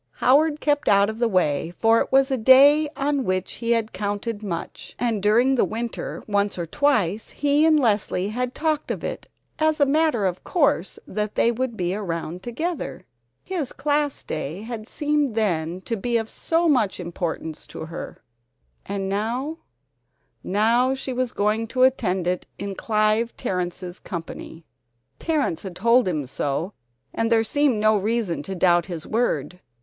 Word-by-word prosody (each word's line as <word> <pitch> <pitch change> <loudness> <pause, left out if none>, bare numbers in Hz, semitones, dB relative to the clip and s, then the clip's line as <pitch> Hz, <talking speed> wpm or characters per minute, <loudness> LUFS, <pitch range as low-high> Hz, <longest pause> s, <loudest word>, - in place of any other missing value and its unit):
Howard 295 +4 +3
kept 290 -1 0
out 200 +1 +4
of 220 - -10
the 240 - +3
way, 170 -6 +1
for 225 0 +4
it - - -3
was 270 +1 +4
a 265 - +1
day 280 +6 +6
on 280 -1 0
which 185 -3 -1
he 230 - -2
had 225 -1 -1
counted 205 +1 -3
much, 190 -6 -6
and 230 -4 -1
during 235 +6 +4
the 260 - +3
winter 230 +1 -4
once 205 -1 0
or 170 - -2
twice 220 - +1
he 290 +2 +2
and 310 -1 +5
Leslie 205 -5 +1
had 250 +3 -3
talked 310 -1 -1
of - - -3
it - - -5 0.3
as 315 0 +2
a 285 - +5
matter 290 -6 +2
of 185 -1 -2
course 280 - +1
that 210 +1 -3
they 235 - +3
would 240 -1 -3
be 180 0 -1
around 175 -3 -4
together. 240 - -4 0.4
His 335 -8 -3
Class 290 -1 -1
Day 155 +6 -5
had 225 -1 -6
seemed 295 -5 0
then 175 -5 0
to 230 - -3
be 235 +3 0
of 225 -1 -3
so 335 +1 +1
much 245 -12 +2
importance 170 -2 -4
to - - -7
her 165 - -7 0.7
and 195 -1 -3
now 240 +11 -2 0.8
now 235 +6 +2
she 265 0 -5
was 250 -1 -1
going 215 +2 0
to 255 +3 +1
attend 190 -9 +2
it 180 +1 -1
in 200 0 -4
Clive 215 +2 0
Terrence's 180 0 -3
company! 165 -1 -8 0.5
Terrence 295 - 0
had 190 -3 -7
told 235 +2 +3
him 155 -6 -1
so, 145 +8 -2 0.4
and 225 +1 -1
there 225 -1 +4
seemed 275 -1 +2
no 215 0 +4
reason 205 -6 0
to 190 +6 -6
doubt 175 -1 +3
his 170 -4 -6
word. 180 - -1
220 Hz, 165 wpm, -23 LUFS, 185-265 Hz, 0.8 s, day